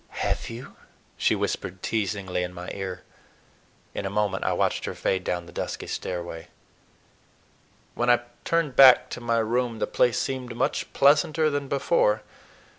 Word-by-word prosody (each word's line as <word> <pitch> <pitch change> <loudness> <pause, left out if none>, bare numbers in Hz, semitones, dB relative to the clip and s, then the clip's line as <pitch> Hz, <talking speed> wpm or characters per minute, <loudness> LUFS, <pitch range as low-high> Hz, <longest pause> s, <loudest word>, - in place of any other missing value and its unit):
"Have - - -1
you?" 115 +2 -9 0.4
she - - +2
whispered 95 0 -3
teasingly 100 -4 -1
in 90 0 -4
my 90 0 -6
ear. 95 -2 -5 0.9
In - - -4
a 95 - -2
moment 100 -1 0
I - - +1
watched - - 0
her - - -4
fade 95 -1 -1
down 90 -1 -2
the 85 - -13
dusky - - -4
stairway. 85 -2 -5 1.5
When 120 +1 0
I 120 0 +5 0.2
turned 165 -6 0
back 130 -2 +8
to 125 - -5
my 115 -1 +1
room 115 +1 0
the - - 0
place 120 -1 +2
seemed 130 -3 -3
much 125 - -1
pleasanter 155 +2 +4
than 145 -1 -2
before. 135 -6 +2
115 Hz, 155 wpm, -26 LUFS, 95-130 Hz, 1.5 s, back